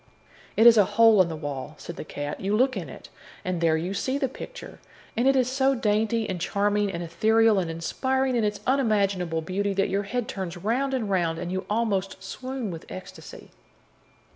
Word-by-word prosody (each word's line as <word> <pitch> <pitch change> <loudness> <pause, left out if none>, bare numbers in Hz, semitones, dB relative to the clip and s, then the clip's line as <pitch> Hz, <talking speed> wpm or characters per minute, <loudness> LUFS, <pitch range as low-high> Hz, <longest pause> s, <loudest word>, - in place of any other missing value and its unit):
"It 225 - +5
is 235 -1 +9
a 210 - +7
hole 225 -3 +7
in 175 - +1
the 160 - -4
wall," 145 -1 -6
said 170 - -8
the - - -6
cat. 145 -1 -5
"You 200 +2 +1
look 255 +1 +2
in 170 -8 -5
it, - - -11 0.4
and 180 -2 -2
there 160 -1 +3
you 175 +4 -3
see 260 +6 -1
the 280 -2 0
picture, - - -10 0.4
and 240 +3 +2
it 270 - +5
is 255 -2 +3
so 265 +1 +2
dainty 220 0 +1
and 180 -3 -4
charming 205 +1 +1
and 175 -1 -4
ethereal 220 +5 +3
and 175 -3 -2
inspiring 260 +11 -1
in 235 - +1
its 210 -1 -1
unimaginable 200 -10 +1
beauty 195 +3 -1
that 195 0 +1
your 195 +2 0
head 240 +3 -3
turns 190 -7 -5
round 255 +9 0
and 235 -5 -2
round, 175 -4 0
and 175 +1 -4
you 190 0 -3
almost 200 -3 -1
swoon 255 +1 -5
with 165 -2 -9
ecstasy." 185 - -10
205 Hz, 200 wpm, -26 LUFS, 180-235 Hz, 0.4 s, is